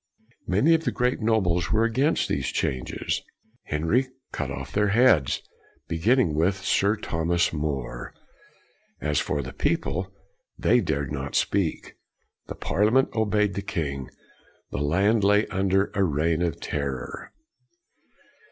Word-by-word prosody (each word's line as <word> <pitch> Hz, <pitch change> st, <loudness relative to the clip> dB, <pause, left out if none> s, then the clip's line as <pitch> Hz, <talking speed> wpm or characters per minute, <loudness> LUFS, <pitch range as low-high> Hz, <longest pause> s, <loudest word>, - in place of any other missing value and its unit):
Many 105 Hz, -, +4 dB
of 165 Hz, 0 st, +2 dB
the -, -, 0 dB
great 125 Hz, 0 st, 0 dB
nobles 95 Hz, -6 st, +1 dB
were 110 Hz, +1 st, +3 dB
against 130 Hz, +7 st, +1 dB
these 65 Hz, -2 st, -1 dB
changes; 65 Hz, -1 st, -2 dB, 0.4 s
Henry 85 Hz, -, +1 dB, 0.2 s
cut 75 Hz, -, -3 dB
off 65 Hz, 0 st, -6 dB
their 105 Hz, 0 st, +2 dB
heads, 100 Hz, -, +3 dB, 0.4 s
beginning 100 Hz, -, +2 dB
with 85 Hz, +6 st, +2 dB
Sir 100 Hz, +1 st, +3 dB
Thomas 85 Hz, -4 st, 0 dB
More. 70 Hz, -5 st, -3 dB, 0.9 s
As 75 Hz, -1 st, 0 dB
for 70 Hz, -, -1 dB
the 65 Hz, -, -8 dB
people, 95 Hz, +2 st, -1 dB, 0.5 s
they -, -, +3 dB
dared 70 Hz, -1 st, -2 dB
not 70 Hz, -1 st, -4 dB
speak. 95 Hz, -6 st, -1 dB, 0.5 s
The -, -, -6 dB
Parliament 110 Hz, +6 st, +2 dB
obeyed 105 Hz, -2 st, +1 dB
the 100 Hz, -, -3 dB
king. 70 Hz, -10 st, -3 dB, 0.6 s
The -, -, -3 dB
land 95 Hz, +9 st, +2 dB
lay 105 Hz, +2 st, +4 dB
under 95 Hz, 0 st, +1 dB
a 100 Hz, -1 st, +2 dB
reign 80 Hz, 0 st, +1 dB
of 85 Hz, -2 st, -1 dB
terror. 70 Hz, -4 st, -4 dB
90 Hz, 130 wpm, -25 LUFS, 75-105 Hz, 0.9 s, Many